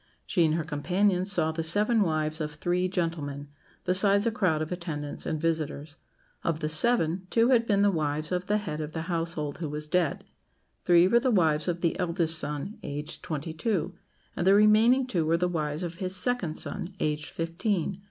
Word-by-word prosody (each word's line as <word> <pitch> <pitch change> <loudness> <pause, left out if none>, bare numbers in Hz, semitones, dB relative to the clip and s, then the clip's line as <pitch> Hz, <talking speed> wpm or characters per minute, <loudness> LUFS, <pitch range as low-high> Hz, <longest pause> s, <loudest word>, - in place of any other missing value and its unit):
She 175 - +2
and 155 0 +1
her 165 - -1
companions 180 +6 0
saw 160 -5 +1
the 160 +1 -3
seven 210 +7 +2
wives 155 -3 0
of 150 -1 -4
three 175 +4 0
gentlemen, 155 -6 -3 0.3
besides 200 +3 +3
a 230 - +2
crowd 180 -9 +1
of 155 - -8
attendants 160 -5 -4
and 155 - -2
visitors. 155 -2 -2 0.5
Of 165 -2 -1
the 155 - -2
seven, 180 0 +2
two 230 +1 +3
had 235 -3 +3
been 200 -1 +3
the 205 - +4
wives 155 -2 -2
of 180 0 -2
the 210 - +2
head 155 -7 -4
of 155 0 -6
the 160 - -3
household, 165 -4 -3
who 160 -3 -3
was 150 +1 -4
dead; 170 -1 0 0.6
three 175 0 +6
were 235 +5 +4
the 260 +2 0
wives 160 -8 +2
of 175 0 -2
his 170 - +2
eldest 170 -2 +2
son, 150 +8 -4
aged 150 +3 -6
twenty 155 +1 -4
two; 185 +3 -1 0.4
and 175 - -1
the 195 - +7
remaining 220 +5 +5
two 185 -10 -1
were 165 +2 +2
the 180 +1 +1
wives 155 -2 -2
of 170 -1 -5
his 185 0 -3
second 185 -5 0
son, 190 -1 -3
aged 150 0 -1
fifteen. 180 +2 -2
170 Hz, 195 wpm, -27 LUFS, 155-190 Hz, 0.6 s, the